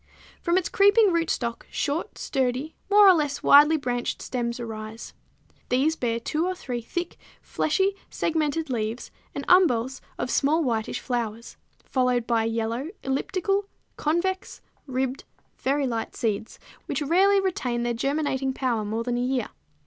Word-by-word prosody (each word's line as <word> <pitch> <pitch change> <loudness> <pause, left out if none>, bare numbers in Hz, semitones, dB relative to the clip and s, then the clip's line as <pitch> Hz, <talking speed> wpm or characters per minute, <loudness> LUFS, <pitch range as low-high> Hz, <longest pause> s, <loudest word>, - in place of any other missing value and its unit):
From 345 0 +2
its 370 - +1
creeping 405 0 +5
rootstocks 295 -8 -1
short, 300 +3 -2
sturdy, 265 +3 -1 0.2
more 410 0 +7
or 380 - +9
less 295 -4 -1
widely 300 +3 +7
branched 245 -4 -2
stems 240 -1 -3
arise. 220 -1 -7 0.6
These 275 +6 +2
bear 230 -5 -1
two 305 +7 -1
or 370 - -2
three 245 -8 -4
thick, 345 +9 -4 0.2
fleshy 385 +6 0
segmented 315 -2 -1
leaves 225 0 -3 0.2
and - - -4
umbels 265 -9 +3 0.2
of 250 - -2
small 310 +4 +2
whitish 225 -5 -1
flowers, 235 -2 -4 0.3
followed 250 -2 +1
by 230 -2 +1
yellow, 230 +5 -2
elliptical, 390 +8 0 0.3
convex, 365 +5 -1 0.3
ribbed, 260 0 -2 0.4
very 280 +1 +1
light 230 -3 -3
seeds, 220 -1 -2 0.3
which 300 - -1
rarely 385 +6 +4
retain 255 -11 -1
their 240 0 0
germinating 270 +1 -1
power 245 -5 -1
more 220 +2 -2
than 240 0 -1
a - - 0
year. 250 -2 -1
265 Hz, 140 wpm, -25 LUFS, 235-325 Hz, 0.6 s, or